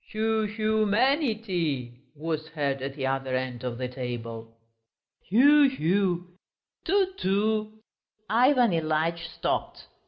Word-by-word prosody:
"Hu 220 0 +1
hu 215 0 0
manity 205 - 0
..." 130 - -40
was 155 +1 -3
heard 145 -4 -2
at 135 +1 -5
the 135 -3 -3
other 135 -1 -1
end 130 -1 -3
of 125 -2 -3
the 125 0 -3
table. 115 -3 -6 0.7
"Hu 285 +7 +6
hu...." 180 -4 -1 0.5
"Tu 385 -1 +1
tu!" 215 +2 0 0.5
Ivan 245 0 +4
Ilyitch 165 +1 -1
stopped. - - -3
175 Hz, 120 wpm, -27 LUFS, 135-220 Hz, 0.7 s, Hu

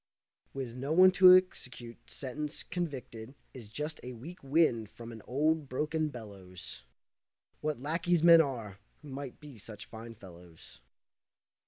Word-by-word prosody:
With 130 -4 -5
no 135 +5 -2
one 185 +2 +8
to 185 0 +9
execute 125 -10 -5
sentence, 150 +3 -5
convicted 130 -8 -5 0.2
Is 120 -5 -10
just 150 +8 -5
the 125 - -7
weak 145 +10 -10
wind 135 -7 +2
from 115 +1 -10
an 110 -1 -9
old, 150 +3 +1
broken 155 +4 -1
bellows. 95 - -10 0.7
What 150 -3 -2
lackeys 165 +4 +1
men 170 -1 +9
are, 115 -9 -4 0.2
who 150 - -10
might 135 -1 -7
be 145 -6 -12
such 105 0 -8
fine 115 +1 -10
fellows! 90 - -13
135 Hz, 140 wpm, -31 LUFS, 115-155 Hz, 0.7 s, to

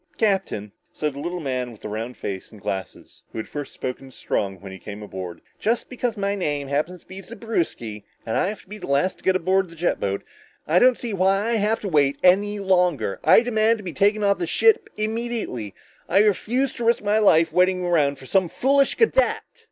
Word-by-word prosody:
"Captain," 190 - 0 0.2
said 150 -2 -2
the 140 - -8
little 175 +4 -3
man 130 -5 -3
with 110 - -15
the - - -6
round 110 +4 -5
face 95 -2 -6
and 110 - -13
glasses 95 0 -6
who - - -9
had 110 - -4
first 145 -2 -6
spoken 130 +1 -6
to - - -17
Strong 95 -5 -2
when 95 +1 -9
he 95 - -9
came 105 +2 -8
aboard, 95 -4 -7 0.2
"just 230 +2 0
because 245 -3 -2
my 200 0 0
name 145 -8 -2
happens 155 +5 -1
to - - -29
be 190 +1 -9
Zewbriski, 170 - -4 0.2
and 110 - -2
I - - +2
have 210 +2 -5
to - - -29
be 210 +2 -9
the - - -7
very 140 - +1
last 185 +5 -2
to - - -22
get 190 - +3
on 190 -1 +3
a - - -12
jet 170 +2 0
boat, 100 0 -2 0.4
I 170 +4 +4
don't 250 +2 +5
see 235 -3 -5
why 195 +3 +2
I - - +1
have 215 +2 +1
to 205 - -4
wait 140 -5 +2
any 200 +3 +4
longer. 180 - +1
I - - +7
demand 225 -1 +2
to 210 - -10
be 175 -3 -5
taken 205 +6 +2
off 200 0 +2
this 350 - -2
ship 445 -2 +3
immediately! 215 - -3 0.3
I 195 - +5
refuse 235 +6 +1
to 240 - -3
risk 230 -2 +2
my 210 +1 +2
life 165 -6 +4
waiting 180 +1 +3
around 150 -5 +2
for 130 - -13
some 185 +4 +2
foolish 275 +6 +2
cadet!" 470 +2 +2
180 Hz, 225 wpm, -23 LUFS, 135-215 Hz, 0.4 s, I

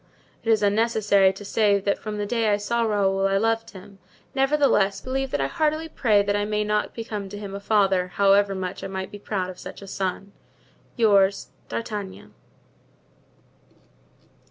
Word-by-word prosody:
"It 230 - -3
is 220 -2 +3
unnecessary 205 -2 +3
to 195 +2 -11
say 205 -1 +2
that 200 +1 -1
from 215 -1 -5
the 205 - -2
day 225 +1 0
I 205 - +3
saw 235 +3 -1
Raoul 195 -3 +1
I 195 0 +1
loved 225 +2 0
him; 195 0 -13 0.3
nevertheless, 270 -8 +2
believe 270 +3 -3
that 145 - -2
I 135 - +1
heartily 310 - -1
pray 215 -9 +2
that 200 0 0
I 205 - 0
may 210 0 -1
not 210 0 -1
become 210 -4 -5
to 205 - -8
him 200 -1 -7
a 200 - -5
father, 195 -3 +2
however 200 +1 +3
much 185 -1 -5
I - - -3
might 190 0 -5
be 205 - -9
proud 190 -3 -3
of 180 - -14
such - - -9
a 200 - -11
son. 195 +1 -4 0.6
"Your 200 -5 +5 0.4
"D'Artagnan. 210 -4 -6
205 Hz, 175 wpm, -24 LUFS, 195-225 Hz, 0.6 s, Your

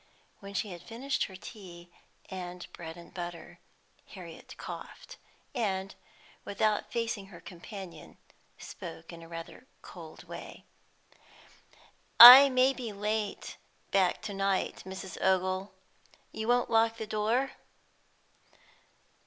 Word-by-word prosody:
When 200 -1 -10
she 205 0 -2
had 175 -1 -9
finished 245 +8 -3
her 190 - -11
tea 180 -4 -12 0.4
and 180 -1 -7
bread 165 0 -9
and 170 - -14
butter, 175 -1 -8 0.5
Harriet - - -11
coughed, - - -9 0.4
and, 195 -6 -2 0.5
without 210 +1 -1
facing 230 -4 -3
her 180 -3 -13
companion, 180 -2 -11 0.4
spoke 80 - -10
in 165 0 -12
rather 165 0 -8
a 255 - -25 0.2
cold - - -12
way. - - -10 1.5
"I 255 +4 +13
may 260 +1 +3
be 245 -4 -6
late 210 +1 -3 0.3
back 190 0 +1
to 210 -2 -5
night, 195 -1 -1
Mrs. 190 -2 -7
Ogle. 185 +1 +1 0.6
You 220 - -5
won't 245 0 +2
lock 225 0 +3
the 220 - -5
door?" 220 +5 0
200 Hz, 115 wpm, -30 LUFS, 180-225 Hz, 1.5 s, I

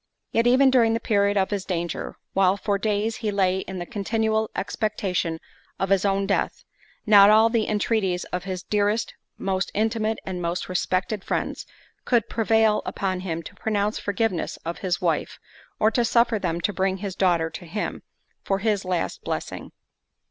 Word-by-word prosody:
Yet 230 +1 +2
even 260 +2 +5
during 230 -3 +4
the - - 0
period 205 -3 +2
of 190 +1 +1
his 200 -2 -1
danger, 170 -3 -3 0.2
while 190 0 +3
for 200 0 -1
days 215 +2 0
he 220 - -2
lay 190 -2 +1
in 190 0 -6
the 175 - -4
continual 220 +2 0
expectation 190 -6 -2 0.4
of 195 - -1
his 195 0 +3
own 195 0 +1
death, 195 - -1 0.4
not 205 -2 +8
all 220 +2 +6
the 225 -2 +1
entreaties 205 -4 0
of 180 0 -2
his 185 -2 -4
dearest, 210 +2 0 0.2
most 190 -1 -1
intimate, 220 +1 0
and 185 -2 -4
most 170 +1 -2
respected 185 +2 -1
friends, - - -3 0.4
could 240 -4 +1
prevail 220 -1 +3
upon 190 -2 -2
him 170 -3 -4
to - - -10
pronounce 210 0 -1
forgiveness 205 -3 -1
of 170 +1 -4
his 180 -2 -1
wife, - - -1 0.4
or 220 - +4
to 240 - +2
suffer 235 -1 +3
them 170 -2 -2
to 205 - 0
bring 190 +1 0
his 195 -1 -5
daughter 170 -4 +2
to 180 - -8
him, 210 +6 -4 0.4
for 195 - 0
his 205 -1 0
last 185 -2 -2
blessing. - - -4
200 Hz, 170 wpm, -24 LUFS, 185-220 Hz, 0.4 s, not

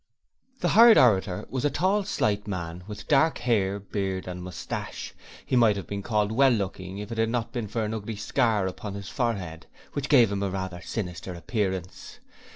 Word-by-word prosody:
The - - +2
hired 230 0 +8
orator 95 -7 +3
was 130 -2 -3
a 145 - +3
tall, 195 +6 +1
slight 105 - 0
man 90 -3 -5
with 105 -1 -8
dark 155 +2 +4
hair, 100 -5 +1
beard 95 -2 -3
and 90 0 -5
moustache, 90 0 -6 0.3
he - - 0
might 115 -4 +5
have 100 - -5
been 100 0 -4
called 105 0 0
well 135 +4 +5
looking 95 -4 -2
if 105 +3 -7
it 115 - -3
had 115 0 +2
not 115 0 -2
been 120 -4 -3
for 110 +2 -2
a 110 +1 -3
ugly 110 +1 -5
scar 105 -1 +1
upon 100 +2 -5
his 100 -1 -7
forehead, 95 - -3 0.3
which 145 0 -3
gave 120 -8 +6
him 100 -1 -2
a 100 - 0
rather 95 -2 -4
sinister 90 -3 -5
appearance. 95 -1 -3
105 Hz, 190 wpm, -26 LUFS, 95-120 Hz, 0.3 s, hired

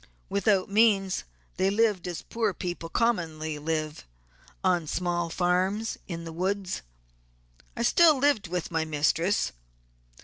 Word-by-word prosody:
Without 200 -1 +2
means 200 -2 +3 0.3
they 190 +2 +2
lived 205 -3 +1
as 175 -2 -5
poor 220 -5 -1
people 175 -1 -5
commonly 160 -9 -1
live, 155 - -3 0.6
on 175 -4 +2
small 175 0 -1
farms 185 +6 0
in 170 -2 -5
the 165 -1 -7
woods. 190 - -2 1.0
I 235 - 0
still 315 +4 +6
lived 270 -7 +2
with 175 0 -3
my 160 -1 +1
mistress. 160 +5 +1
180 Hz, 125 wpm, -27 LUFS, 165-205 Hz, 1.0 s, still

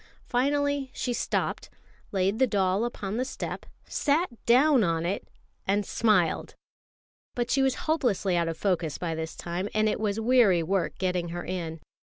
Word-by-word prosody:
Finally 285 +2 +1
she 245 - -1
stopped, - - -2 0.4
laid 195 +3 +1
the 260 - +5
doll 195 0 +1
upon 210 -3 -4
the 250 - +1
step, 260 - -5 0.2
sat 315 +5 +1 0.2
down 260 +1 +5
on 165 -2 0
it, 190 +3 -2 0.4
and 200 +1 +2
smiled. 205 -7 +1 0.8
But 245 0 -1
she 275 - +3
was 265 -1 +2
hopelessly 235 - +1
out 170 -1 +1
of 165 - -3
focus 175 -6 0
by 170 -2 -2
this 160 0 -4
time, 175 +4 -4
and 215 0 +3
it 210 - 0
was 210 0 -1
weary 225 -7 +4
work 190 +2 -1
getting 180 -2 -1
her 175 +1 -5
in. 165 -3 -4
200 Hz, 165 wpm, -27 LUFS, 175-250 Hz, 0.8 s, the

